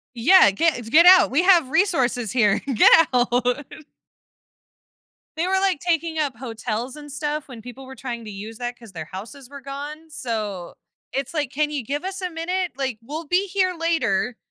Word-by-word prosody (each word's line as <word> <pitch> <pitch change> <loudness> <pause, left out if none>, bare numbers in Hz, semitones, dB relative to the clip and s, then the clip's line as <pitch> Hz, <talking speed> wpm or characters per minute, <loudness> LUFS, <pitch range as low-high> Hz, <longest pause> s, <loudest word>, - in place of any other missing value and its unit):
Yeah, 290 - +6
get 240 0 -1
get 335 +6 +6
out. 370 0 +8
We 285 +7 +2
have 350 -7 +4
resources 265 - +1
here 210 -6 +2
get 280 +5 +6
out. 245 -1 +1 2.0
They 335 +3 -1
were, 380 0 +1
like, 385 -6 +1
taking 330 -2 -1
up 285 -6 -1
hotels 235 +2 -5
and 295 -1 -11
stuff 295 +1 -4
when 240 -4 -11
people 250 +3 -11
were 265 - -10
trying 240 -3 -6
to 215 - -8
use 210 +3 -9
that 245 0 -5
'cause 230 -5 -14
their 160 -2 -6
houses 220 - -10
were 280 0 -10
gone, 290 +4 -8
so 215 - -5 0.4
it's 270 +1 -3
like, 295 -5 -2
can 300 +2 -1
you 290 -3 -3
give 285 +8 -4
us 385 0 -5
a 365 - -2
minute? 355 +2 -3
Like, 265 -5 -3
we'll 305 +7 -6
be 360 +6 +1
here 370 -1 0
later, 255 - -1
275 Hz, 180 wpm, -22 LUFS, 235-330 Hz, 2.0 s, out